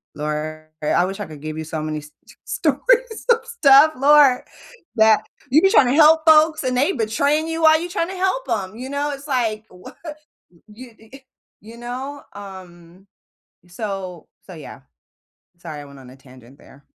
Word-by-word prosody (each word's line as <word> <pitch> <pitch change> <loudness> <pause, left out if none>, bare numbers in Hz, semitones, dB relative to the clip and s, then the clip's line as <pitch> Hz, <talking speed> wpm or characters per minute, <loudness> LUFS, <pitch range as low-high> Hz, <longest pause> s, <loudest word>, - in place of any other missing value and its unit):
"Lord 150 +1 -5 0.2
I 150 - -1
I 175 - +2
wish 195 +2 -6
I - - -4
could 150 -2 -12
give 155 0 -6
you 160 - -5
so 160 0 -5
many 155 0 -4
s 150 0 -14 0.2
s - - -17
stories - - 0
of 465 0 -6
stuff, 310 -9 +5
Lord, 280 -2 +5 0.5
that 220 -2 +4 0.3
you 310 +5 +5
be 385 - +4
tryna 255 -6 +4
help 315 +1 +5
folks, 315 0 +4
and 255 0 -1
they 285 +9 +2
betraying 285 - 0
you 325 0 -4
while 315 0 +6
you're 350 +2 -6
trying 345 -2 -2
to 380 - -7
help 380 +7 -1
'em," 195 -2 -3
you 255 +2 -7
know? 285 +1 -2
It's 280 +1 -9
like, 225 -6 -2
wha 180 0 -14 0.8
you 240 +4 -13
i 220 0 -22
eh, - - -15 0.4
you 225 +3 -14
know? 260 +4 -7
Um, 185 -2 -13 0.6
so 190 -3 -7 0.2
so, - - -11
yeah. - - -12 0.8
Sorry, 155 -4 -8
I 145 - -12
went 140 -1 -15
on 125 -1 -14
a - - -15
tangent 130 0 -18
there. 140 +1 -19
230 Hz, 185 wpm, -20 LUFS, -, 0.8 s, while